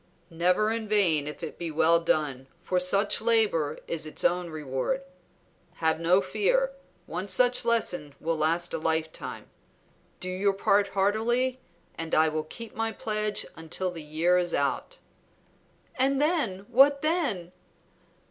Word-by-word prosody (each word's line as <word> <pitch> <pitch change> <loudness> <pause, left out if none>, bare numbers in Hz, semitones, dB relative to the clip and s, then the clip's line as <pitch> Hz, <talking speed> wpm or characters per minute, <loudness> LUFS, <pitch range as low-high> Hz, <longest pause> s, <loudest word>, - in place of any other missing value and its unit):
"Never 180 +6 +2
in 225 -1 -3
vain 175 -9 +2
if 150 +3 -7
it 160 - -7
be 170 -1 -3
well 160 +2 +4
done, 145 -5 -1 0.2
for 185 - 0
such 195 +3 +3
labor 215 -10 +2
is 160 -2 -3
its 155 - -2
own 175 0 +1
reward. 155 - -3 0.7
Have 160 -1 0
no 175 +3 +3
fear; - - +1 0.3
one 180 +4 -5
such 245 +7 +3
lesson 180 -11 0
will 165 +1 -1
last 165 +3 0
a - - -1
lifetime. 160 0 -3 0.7
Do 180 - -6
your 190 +2 0
part 200 +1 +2
heartily, 225 +7 0 0.4
and 165 0 -2
I 160 0 +4
will 155 0 -3
keep 230 +8 -10
my 225 0 -2
pledge 215 0 -2
until 165 +3 -4
the 165 -2 -7
year 160 +4 +1
is 175 -1 -1
out." 140 - -1 1.0
"And 270 +1 +2
then, 280 - 0
what 275 +3 +5
then?" 280 - -1
185 Hz, 145 wpm, -27 LUFS, 160-225 Hz, 1.0 s, what